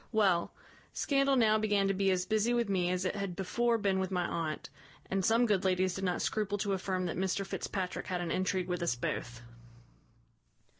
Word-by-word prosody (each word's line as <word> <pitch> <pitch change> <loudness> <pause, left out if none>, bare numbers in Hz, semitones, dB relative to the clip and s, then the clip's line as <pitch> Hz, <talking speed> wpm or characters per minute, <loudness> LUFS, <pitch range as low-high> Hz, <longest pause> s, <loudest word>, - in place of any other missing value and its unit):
Well, 195 -6 +2 0.4
scandal 275 -1 +2
now 220 -3 +4
began 205 -2 +2
to 195 - +2
be 195 0 +1
as 180 -1 +1
busy 220 +2 +1
with 235 -2 +1
me 180 -3 +1
as 180 +1 -1
it 185 - -1
had 200 -3 -3
before 235 +5 +1
been 200 -3 +1
with 190 -1 -1
my 180 -2 0
aunt; 155 -4 -3 0.4
and 195 0 +1
some 230 +4 +4
good 205 -4 +1
ladies 185 -1 +2
did 190 - -5
not 180 -2 0
scruple 205 -2 -1
to 200 0 -1
affirm 185 -1 -1
that 170 - -3
Mr 190 +1 -1
Fitzpatrick 190 -1 -4
had 180 -1 -2
an 175 -1 -3
intrigue 185 0 0
with 180 -1 -2
us 170 -8 +1
both. 120 -1 -4
190 Hz, 200 wpm, -32 LUFS, 180-210 Hz, 0.4 s, now